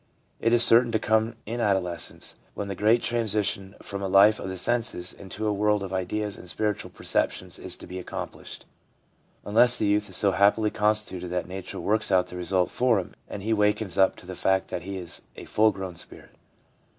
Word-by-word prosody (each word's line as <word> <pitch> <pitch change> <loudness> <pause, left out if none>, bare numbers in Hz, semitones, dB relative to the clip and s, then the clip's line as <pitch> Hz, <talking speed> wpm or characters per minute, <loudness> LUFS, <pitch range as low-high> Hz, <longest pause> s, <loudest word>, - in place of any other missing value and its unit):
It 115 - +2
is 120 0 +6
certain 120 +1 +6
to - - +4
come 110 +1 +1
in 115 +3 -4
adolescence, 95 -6 -1 0.2
when 100 - -4
the - - -2
great 110 +5 +3
transition 105 -4 -1
from 100 -1 -5
a 100 - -1
life 100 +3 +6
of - - -5
the 95 - -5
senses 115 -5 -1
into 100 +3 -7
a 105 - +1
world 105 0 +1
of 95 -1 -6
ideas 100 +2 -2
and 90 - -11
spiritual 105 +1 -2
perceptions - - -2
is - - -5
to - - -11
be 95 - -7
accomplished, 90 - -7 0.8
unless 120 +4 +5
the - - 0
youth 105 0 +1
is - - -3
so 100 - +2
happily 105 +2 +3
constituted 105 -4 0
that 90 0 -3
nature 95 0 -7
works 105 0 0
out 90 -1 +4
the - - -9
result 90 0 0
for 125 -3 +2
him 95 - -4 0.2
and 100 - -6
he 110 +2 +1
wakens 105 -3 +1
up 95 0 +4
to - - -14
the 95 - -7
fact 95 +1 +1
that - - -4
he 95 +2 -6
is 90 -2 -5
a - - -9
full 110 0 +3
grown 95 -2 -6
spirit. - - -9
100 Hz, 205 wpm, -26 LUFS, 95-110 Hz, 0.8 s, is